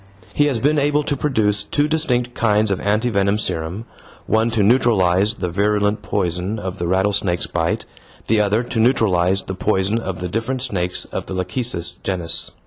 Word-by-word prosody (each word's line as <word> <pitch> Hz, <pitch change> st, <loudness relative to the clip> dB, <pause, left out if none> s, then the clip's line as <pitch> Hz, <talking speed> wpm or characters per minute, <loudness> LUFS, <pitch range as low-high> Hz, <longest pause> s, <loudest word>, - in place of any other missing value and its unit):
He 145 Hz, -, +3 dB
has 130 Hz, -5 st, 0 dB
been 150 Hz, +5 st, +2 dB
able 145 Hz, +1 st, +1 dB
to 145 Hz, -, -1 dB
produce 110 Hz, -8 st, +1 dB
two 145 Hz, +8 st, 0 dB
distinct 125 Hz, -6 st, 0 dB
kinds 105 Hz, -2 st, +2 dB
of 95 Hz, -, 0 dB
anti 110 Hz, +4 st, 0 dB
venom 100 Hz, 0 st, +1 dB
serum, 90 Hz, +1 st, -3 dB, 0.4 s
one 110 Hz, +2 st, +2 dB
to 115 Hz, -3 st, +1 dB
neutralize 105 Hz, -3 st, +3 dB
the 90 Hz, -4 st, -3 dB
virulent 105 Hz, +2 st, +1 dB
poison 95 Hz, 0 st, -2 dB
of 95 Hz, -2 st, -5 dB
the 85 Hz, -, -2 dB
rattlesnake's 95 Hz, -1 st, +1 dB
bite, 80 Hz, -1 st, -2 dB, 0.4 s
the 110 Hz, -1 st, +2 dB
other 105 Hz, +3 st, +1 dB
to 120 Hz, -1 st, -3 dB
neutralize 95 Hz, -6 st, +2 dB
the 95 Hz, -, -5 dB
poison 95 Hz, +2 st, 0 dB
of 95 Hz, -5 st, -5 dB
the 90 Hz, -, -3 dB
different 115 Hz, +7 st, -2 dB
snakes 90 Hz, -8 st, -2 dB
of -, -, -6 dB
the 95 Hz, -, -5 dB
lachecis 95 Hz, -3 st, -2 dB
genus. 85 Hz, -3 st, -1 dB
105 Hz, 175 wpm, -20 LUFS, 95-115 Hz, 0.4 s, He